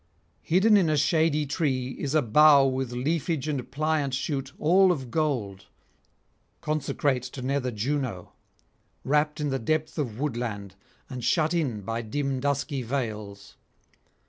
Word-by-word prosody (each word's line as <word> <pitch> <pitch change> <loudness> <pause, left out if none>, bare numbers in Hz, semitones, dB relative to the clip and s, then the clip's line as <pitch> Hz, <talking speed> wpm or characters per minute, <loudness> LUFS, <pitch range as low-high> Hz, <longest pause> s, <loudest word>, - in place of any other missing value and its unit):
Hidden 205 +5 +4
in 180 -5 +3
a 155 - +2
shady 155 0 +2
tree 135 -3 -1
is 140 +3 -4
a 155 - +4
bough 145 +4 +6
with 130 -2 -1
leafage 155 +3 -1
and 140 -5 -3
pliant 150 -2 0
shoot 135 0 -3
all 185 +4 +4
of 135 -8 -4
gold, 125 -12 -2 0.9
consecrate 145 -3 -1
to 125 +1 -8
nether 135 -1 -1
Juno, 120 -3 -3 0.7
wrapped 150 +2 +1
in 150 -1 -1
the 135 -1 -1
depth 155 +6 -1
of 120 -6 -3
woodland 115 -8 -3 0.3
and 125 -3 -7
shut 155 +6 +2
in 135 -11 -1
by 115 +4 -3
dim 135 +3 -2
dusky 140 0 -1
vales. 110 -5 -5
140 Hz, 140 wpm, -26 LUFS, 125-155 Hz, 0.9 s, bough